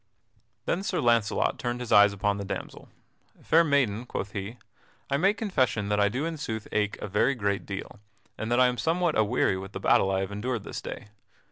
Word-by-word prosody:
Then 175 - 0
Sir 195 - -2
Launcelot 115 -4 +1
turned 120 0 -2
his 125 -2 -6
eyes 105 +1 +7
upon 100 0 -1
the 100 - -4
damsel: 95 - -7 0.5
"Fair 165 +2 +5
maiden," 125 -7 +1
quoth 100 -3 -4
he, 100 +3 -6 0.5
"I 140 - +3
make 195 +7 +2
confession 130 - 0
that 105 0 +1
I 100 0 +4
do 130 +8 -2
in 165 -1 -3
sooth 110 -6 -5
ache 105 0 0
a - - -6
very 105 +7 +2
great 100 -3 -2
deal, 100 +1 -6 0.4
and 110 +2 -5
that 120 - +3
I 130 - +6
am 125 -1 0
somewhat 170 0 +1
aweary 105 -3 +2
with 95 0 -9
the - - -4
battle 95 - +3
I 95 0 +1
have 95 +1 -4
endured 110 +2 -3
this - - -6
day. - - -8
110 Hz, 210 wpm, -27 LUFS, 100-135 Hz, 0.5 s, eyes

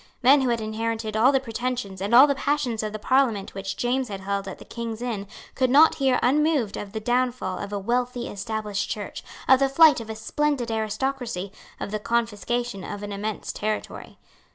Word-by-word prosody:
Men 270 +3 +7
who 260 - +1
had 235 -1 0
inherited 220 0 -3
all 235 +5 +5
the 270 - +3
pretensions 240 -5 -4
and 200 - -2
all 260 +3 +10
the 285 - +2
passions 275 -5 -1
of 215 -1 -3
the 215 - -4
Parliament 230 -3 +1
which 195 -1 -5
James 250 +1 0
had 195 -3 -6
held 200 0 -2
at 190 - -6
the - - -13
Kings 230 -2 -5
Inns 225 -5 -4 0.3
could 255 -1 +1
not 295 +5 +7
hear 265 -3 +2
unmoved 285 -4 +2
of 200 - -6
the 220 - -2
downfall 240 -4 -1
of 200 - -6
a 205 - -2
wealthy 245 +4 -1
established 210 -1 -3
Church, 205 -2 -5 0.2
of 265 - +7
the 275 0 +3
flight 310 +1 +6
of 225 - -9
a 220 - -4
splendid 255 +1 -1
aristocracy, 220 -2 -2 0.3
of - - -5
the 215 - -2
confiscation 230 -1 -1
of 205 0 -6
an 205 - -5
immense 205 +1 -4
territory. 215 +1 -4
230 Hz, 200 wpm, -25 LUFS, 210-255 Hz, 0.3 s, all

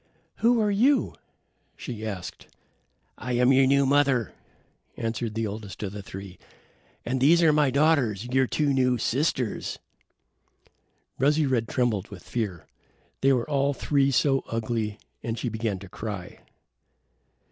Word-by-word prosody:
"Who 235 +1 +3
are 210 -1 +2
you?" 255 +8 +3 0.6
she 115 -4 -7
asked. 100 -5 -6 0.7
"I 125 - -3
am 125 +2 +4
your 135 0 +5
new 140 +1 +4
mother," 135 -4 +2 0.6
answered 115 -1 -3
the 115 0 -1
eldest 105 0 -6
of 100 - -3
the 105 0 -7
three, 95 -2 -10 0.7
"and 130 +1 -1
these 170 +5 +5
are 155 -2 +5
my 150 -2 +3
daughters, 130 -7 +2
your 130 +1 +1
two 145 +1 +1
new 125 -2 +2
sisters." 125 -1 -1 1.4
Rosy 150 +3 +3
red 125 -4 0
trembled 115 -6 0
with 100 -4 -11
fear. 100 -9 -4 0.6
They 135 - +4
were 125 -3 +1
all 140 -1 +1
three 140 -1 +2
so 135 0 +2
ugly, 110 -2 -2 0.2
and 115 -1 -3
she 120 - -2
began 110 -2 -2
to 95 +1 -11
cry. 100 -2 -7
125 Hz, 140 wpm, -26 LUFS, 110-140 Hz, 1.4 s, your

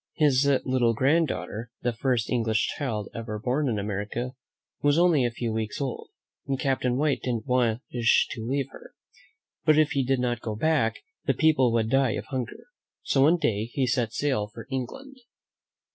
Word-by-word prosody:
His 140 -3 +3 0.2
little 125 -3 +2
granddaughter, 130 -4 0
the 120 -1 +1
first 120 -1 0
English 115 -3 +1
child 110 -8 -3
ever 115 -2 -5
born 130 +6 0
in 110 - -1
America, 105 +5 -3 0.5
was 145 +1 +3
only 170 -6 +4
a 120 - +2
few 115 -1 -3
weeks 110 -1 -3
old, 135 -3 -4 0.4
and 135 -1 -1
Cap 135 -1 0
tain 125 0 +1
White 145 0 +1
didn't 120 -4 -2
wish 120 -1 +2
to 115 - -5
leave 135 +3 -2
her; - - -14 0.7
but 155 -1 +4
if 155 -1 +4
he 135 - +1
did 130 0 +1
not 120 -2 -1
go 110 -2 -4
back, 145 -2 +1 0.3
the - - +3
people 150 -6 +4
would 115 -1 +1
die 135 -4 +3
of - - -4
hun 130 -3 -1
ger. 235 - -12 0.4
So 135 - +2
one 150 +5 +6
fine 175 - 0
day 105 +1 -3
he 130 +3 -1
set 125 -3 0
sail 125 -4 0
for 105 - -11
England. 265 - -5
125 Hz, 185 wpm, -26 LUFS, 115-140 Hz, 0.7 s, one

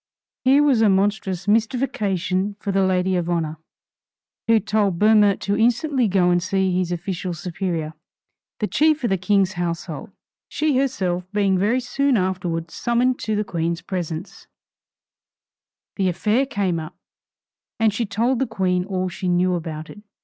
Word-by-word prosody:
Here 270 +3 +5
was 270 -6 +3
a 220 - +5
monstrous 195 -1 0
mystification 205 -4 0
for 200 - -3
the 195 0 +2
lady 185 0 +1
of 175 -1 -1
honor, 160 -3 -2 0.9
who 225 -1 +5
told 205 -3 0
Boehmer 210 0 +5
to 200 - 0
instantly 245 +3 +2
go 185 -2 +3
and 175 0 +2
see 190 0 0
his 180 -1 0
official 175 0 -3
superior, 165 -2 -3 0.7
the 215 - 0
chief 305 +5 +2
of 235 - 0
the 195 - +2
king's 195 0 +2
household. 170 -4 -4 0.4
She 305 -3 0
herself 185 -9 -1
being 200 -2 +2
very 210 +7 +2
soon 265 +1 +1
afterwards 175 -3 -2
summoned 245 +1 +1
to 215 - -2
the 210 - 0
Queen's 170 -2 -2
presence, 175 -1 -5 1.5
the 190 -2 +2
affair 215 +9 +1
came 190 -9 -1
up, 155 +2 -8 0.8
and 220 -2 +3
she 230 +1 -2
told 230 +4 0
the 265 - 0
Queen 185 -4 0
all 185 -2 -2
she 185 +1 -5
knew 180 +1 +2
about 160 -2 -4
it. 205 - -12
195 Hz, 155 wpm, -22 LUFS, 180-220 Hz, 1.5 s, Here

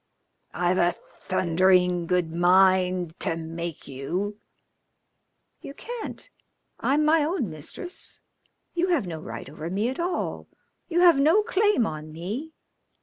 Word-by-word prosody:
"I've 180 +1 +1
a 175 0 +3
thundering 180 0 +1
good 180 -2 0
mind 180 -1 +3
to 165 - 0
make 165 0 -6
you." 180 +10 -4 1.2
"You 275 - -9
can't. 480 +4 -2 0.5
I'm 295 +2 +2
my 310 0 +4
own 295 - -1
mistress. 155 - -4 0.5
You 355 +1 +1
have 335 - +1
no 165 -3 -5
right 115 -6 -7
over 155 +3 -7
me 205 +6 0
at 265 - -5
all. 350 +1 -2 0.4
You 345 0 +2
have 340 -5 +7
no 325 +9 +5
claim 415 - +2
on 155 -3 -6
me. 205 - -5
185 Hz, 130 wpm, -26 LUFS, -, 1.2 s, have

